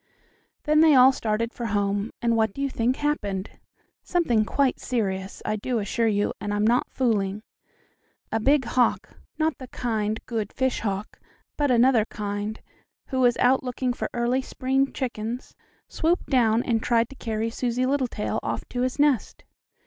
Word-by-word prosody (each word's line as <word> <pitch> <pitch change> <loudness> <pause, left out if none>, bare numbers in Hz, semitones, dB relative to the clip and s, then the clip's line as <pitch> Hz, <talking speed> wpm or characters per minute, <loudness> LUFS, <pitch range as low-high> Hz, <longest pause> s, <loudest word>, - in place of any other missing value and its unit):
Then 305 0 +3
they 315 -3 +6
all 255 +1 +8
started 230 -1 -2
for 235 - -4
home, 205 0 0
and 235 -1 +2
what 220 -2 +1
do 275 - -5
you 275 - -1
think 240 +2 +1
happened? 205 -11 -2 0.5
Something 245 -12 +1
quite 275 +3 +1
serious, 195 -6 -3
I 215 0 0
do 240 +3 -2
assure 225 +2 0
you, 205 -1 +1
and 205 - -3
I'm 210 +1 +1
not 240 +3 +2
fooling. 215 -5 0 0.9
A 225 - +1
big 275 +3 +3
hawk, 245 -1 +1 0.3
not 315 -1 0
the 260 - -8
kind, 220 -4 -2
good 220 -4 -3
fish 260 -1 0
hawk, 200 -1 -4 0.4
but 290 -1 +1
another 245 -2 +4
kind, 205 0 -4 0.5
who 260 - -1
was 245 -2 +4
out 260 +2 +3
looking 250 0 -2
for - - -4
early 245 +2 0
spring 270 +1 0
chickens, 240 -1 -4 0.3
swooped 340 +3 0
down 235 -3 +3
and 225 -2 0
tried 230 -1 +2
to 275 - -12
carry 225 -2 -3
Susie 245 +1 -1
Littletail 255 -5 -1
off - - -4
to 245 - -3
his 255 0 -1
nest. 285 -7 +1
235 Hz, 165 wpm, -25 LUFS, 215-260 Hz, 0.9 s, all